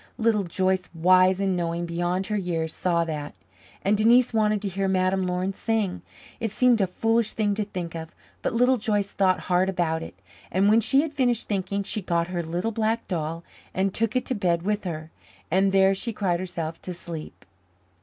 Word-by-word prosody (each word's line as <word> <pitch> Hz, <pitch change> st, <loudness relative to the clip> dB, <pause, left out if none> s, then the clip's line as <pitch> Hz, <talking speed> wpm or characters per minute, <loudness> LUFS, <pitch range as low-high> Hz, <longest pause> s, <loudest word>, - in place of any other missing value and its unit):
Little 220 Hz, -3 st, +2 dB
Joyce, 185 Hz, +1 st, 0 dB
wise 185 Hz, +2 st, +4 dB
and 195 Hz, -2 st, +1 dB
knowing 170 Hz, 0 st, -2 dB
beyond 175 Hz, +2 st, -1 dB
her 210 Hz, -, -2 dB
years, 165 Hz, -5 st, -2 dB
saw 170 Hz, -2 st, +1 dB
that. 150 Hz, -7 st, -5 dB, 0.5 s
And 200 Hz, +2 st, +3 dB
Denise 235 Hz, +4 st, +4 dB
wanted 215 Hz, -1 st, +2 dB
to -, -, -1 dB
hear 195 Hz, +1 st, -1 dB
Madame 185 Hz, 0 st, +1 dB
Laurin 180 Hz, +2 st, -1 dB
sing. 215 Hz, -3 st, -1 dB, 0.4 s
It 225 Hz, -, -1 dB
seemed 240 Hz, +1 st, +3 dB
a 190 Hz, -, +2 dB
foolish 225 Hz, +4 st, +1 dB
thing 210 Hz, -2 st, +1 dB
to 210 Hz, +1 st, -2 dB
think 180 Hz, -4 st, -5 dB
of, 160 Hz, -1 st, -6 dB, 0.3 s
but -, -, -1 dB
Little 250 Hz, +3 st, +3 dB
Joyce 205 Hz, -3 st, 0 dB
thought 185 Hz, -2 st, +1 dB
hard 185 Hz, +1 st, +1 dB
about 165 Hz, -3 st, 0 dB
it; 95 Hz, -, -9 dB, 0.3 s
and 195 Hz, +3 st, +3 dB
when 220 Hz, +2 st, +5 dB
she 270 Hz, +5 st, +4 dB
had 310 Hz, -1 st, -4 dB
finished 245 Hz, -5 st, +1 dB
thinking, 200 Hz, 0 st, -1 dB
she 210 Hz, +2 st, -2 dB
got 170 Hz, -1 st, 0 dB
her 175 Hz, -1 st, -2 dB
little 175 Hz, +7 st, -2 dB
black 225 Hz, +1 st, -1 dB
doll 165 Hz, -1 st, -3 dB, 0.3 s
and 190 Hz, 0 st, +1 dB
took 230 Hz, +2 st, 0 dB
it 255 Hz, -, +1 dB
to -, -, -1 dB
bed 175 Hz, -6 st, 0 dB
with 210 Hz, +1 st, -1 dB
her, 160 Hz, -2 st, -5 dB, 0.4 s
and 190 Hz, +2 st, +3 dB
there 195 Hz, 0 st, +5 dB
she 230 Hz, +5 st, -3 dB
cried 185 Hz, -5 st, 0 dB
herself 165 Hz, -3 st, -5 dB
to 180 Hz, -, -6 dB
sleep. 165 Hz, -3 st, -9 dB
190 Hz, 195 wpm, -25 LUFS, 175-215 Hz, 0.5 s, when